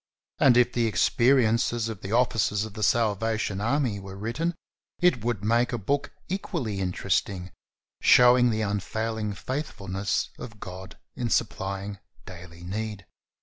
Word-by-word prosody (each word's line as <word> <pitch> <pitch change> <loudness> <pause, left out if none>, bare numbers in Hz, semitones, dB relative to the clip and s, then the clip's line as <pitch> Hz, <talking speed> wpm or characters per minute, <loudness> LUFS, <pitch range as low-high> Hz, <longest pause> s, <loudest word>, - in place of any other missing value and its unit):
And 125 -3 +6
if 125 0 +4
the 120 -1 +2
experiences 115 0 +3
of 110 -3 -6
the 95 - -6
officers 115 -3 +2
of 110 - -9
The 110 - -7
Salvation 110 -2 +1
Army 120 -3 0
were 95 0 -9
written, 120 - -2 0.4
it 175 -11 +3
would 115 -4 -1
make 120 +4 +2
a 120 - -1
book 140 +7 -1 0.2
equally 155 - -3
inter 90 -1 -3
esting, 90 -1 0 0.5
showing 125 0 +6
the 110 -1 0
unfailing 110 +1 -2
faithfulness 100 -6 -3
of 105 -4 -9
God 95 +1 -9 0.2
in 120 -1 -2
supplying 100 -2 -2 0.3
daily 85 -1 -11
need. 105 +1 -4
110 Hz, 140 wpm, -26 LUFS, 100-120 Hz, 0.5 s, And